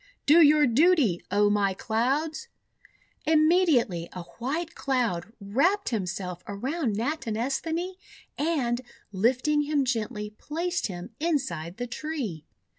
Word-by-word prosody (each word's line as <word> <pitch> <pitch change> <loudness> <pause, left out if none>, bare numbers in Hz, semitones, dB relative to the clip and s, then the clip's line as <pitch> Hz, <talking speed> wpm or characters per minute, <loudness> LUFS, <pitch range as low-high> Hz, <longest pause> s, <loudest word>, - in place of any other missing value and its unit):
"Do 320 +4 +7
your 300 0 +6
duty, 265 - +3
O 205 +1 +3
my 200 -2 +1
Clouds!" 270 +9 -1 0.8
Immediately 310 - +3
a 180 - -6 0.2
White 315 +8 -2
Cloud 230 -9 -1
wrapped 280 - +1
him 210 -6 -1
self 180 -1 -5
around 245 +4 -2
Natinesthani, 290 - -2 0.4
and, 270 -6 0 0.3
lifting 255 +9 +2
him 290 -2 +1
gently, 215 -3 -2
placed 345 +4 -2
him 185 +2 -7
inside 265 - -2
the 245 - -3
tree. 245 - -5
255 Hz, 115 wpm, -27 LUFS, 205-310 Hz, 0.8 s, Do